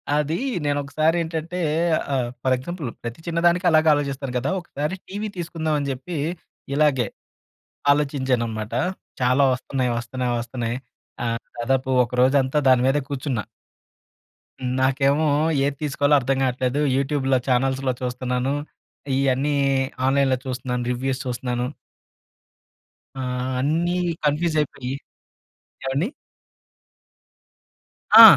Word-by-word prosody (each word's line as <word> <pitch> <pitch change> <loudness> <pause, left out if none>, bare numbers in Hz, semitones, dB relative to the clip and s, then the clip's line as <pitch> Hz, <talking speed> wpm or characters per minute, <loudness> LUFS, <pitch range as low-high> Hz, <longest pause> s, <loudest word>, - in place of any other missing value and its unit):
అదీ 150 +2 +1 0.3
నేనొకసారేంటంటే 160 +4 0 0.6
ఆహ్, 125 -3 0
for 130 - +3
example 155 +3 -5 0.2
ప్రతి 115 +3 -5
చిన్నదానికి 170 +2 +2
అలాగే 155 0 +5
ఆలోచిస్తారు 140 -2 -2
కదా! 130 +3 -1
ఒకసారి 150 0 -3
టీవీ 205 +3 -4
తీసుకుందాం 165 -2 -2
అని 140 -1 -2
చెప్పి 140 +6 -5 0.6
ఇలాగే 145 -4 +3 0.8
ఆలోచించాన్నమాట. 125 -7 0 0.5
చాలా 130 +3 +4
వస్తన్నయి, 125 0 -1
వస్తన్నయి, 125 +1 -2
వస్తన్నయి 120 -1 -3 0.5
ఆహ్, 115 0 -1 0.2
దాదాపు 130 +2 0 0.2
ఒక 120 - -15
రోజంతా 135 +1 +3
దాని 130 -1 +5
మీదే 140 +2 +2
కూర్చున్నా. 130 -5 -2 1.1
హ్మ్, 125 -1 -2
నాకేమో 140 +3 +3 0.4
ఏది 140 0 0
తీసుకోవాలో 145 0 +3
అర్థం 135 +1 0
కావట్లేదు. 130 +1 0 0.2
యూట్యూబ్‌లో, 135 -1 +1
ఛానల్స్‌లో 130 +1 +1
చూస్తున్నాను. 125 +1 -1 0.6
ఇ‌యన్నీ 135 +2 +2 0.5
ఆన్‍లైన్‍లో 135 -1 +3
చూస్తున్నాను, 125 -1 -2
రివ్యూస్ 130 +2 -1
చూస్తున్నాను. 125 0 -2 1.5
ఆ! - - -2 0.4
అన్ని 165 +5 +1 0.3
కన్‌ఫ్యూస్ 155 +2 +1
అయిపోయి 130 -3 -4 0.9
ఏవండీ? 135 +8 0 2.1
ఆ! - - +14
135 Hz, 100 wpm, -23 LUFS, 125-150 Hz, 2.1 s, ఆ